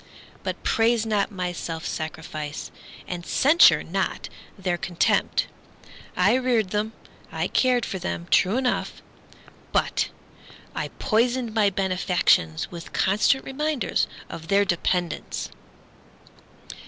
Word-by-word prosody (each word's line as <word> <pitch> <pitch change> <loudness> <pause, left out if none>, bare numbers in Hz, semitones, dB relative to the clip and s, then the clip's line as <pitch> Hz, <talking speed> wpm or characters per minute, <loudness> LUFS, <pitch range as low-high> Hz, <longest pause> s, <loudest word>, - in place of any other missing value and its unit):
But - - -4
praise 225 0 +2
not 210 -2 0
my 180 -2 -3
self 165 -2 -5
sacrifice. 155 -1 -5 0.4
And 175 -1 -5
censure 300 - +5
not - - -2 0.3
their 185 -2 -1
contempt; 175 0 +1 0.7
I 185 +4 +4
reared 245 -6 +1
them, 210 +2 -1 0.4
I - - -1
cared 250 -2 +2
for 190 - -4
them, 85 - -4
true 195 +5 +4
enough!— 260 -1 -1 0.7
But - - +1 0.6
I - - -2
poisoned 240 0 +1
my 215 -3 +4
benefactions 180 - +1
With 170 -1 -9
constant 210 +8 +2
reminders 300 0 -1 0.2
of 165 0 -8
their 200 +2 +3
dependence. 175 -1 -1
195 Hz, 110 wpm, -25 LUFS, 175-235 Hz, 0.7 s, censure